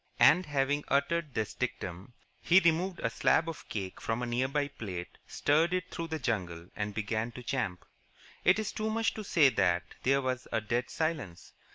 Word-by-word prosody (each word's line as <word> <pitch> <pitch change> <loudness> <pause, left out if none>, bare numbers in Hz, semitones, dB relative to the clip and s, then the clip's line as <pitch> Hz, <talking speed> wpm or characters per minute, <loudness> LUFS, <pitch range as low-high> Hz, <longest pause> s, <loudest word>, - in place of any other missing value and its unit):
And, 160 +6 +6
having 145 0 +1
uttered 150 +1 0
this 110 -2 -1
dictum, 105 -4 -4 0.3
he 175 +2 +6
removed 175 +2 +1
a 115 - +2
slab 160 +7 +3
of 165 - -7
cake 95 -3 -5
from 115 +2 -1
a - - 0
near 120 +2 0
by 145 +1 0
plate, 90 -9 -7
steered 165 +5 +2
it 185 0 -3
through 165 -1 -4
the 160 -1 -3
jungle, 90 - -3
and 105 -1 -3
began 110 +2 -1
to 125 - -9
champ. 120 -9 -2 0.6
It 190 - +5
is 215 -1 -2
too 215 0 -2
much 225 +1 +1
to 215 - -6
say 160 -8 +5
that 90 -7 +2 0.2
there 135 +1 +2
was 130 0 -2
a - - +2
dead 120 +3 -1
silence. 155 - -3
130 Hz, 190 wpm, -31 LUFS, 110-165 Hz, 0.6 s, And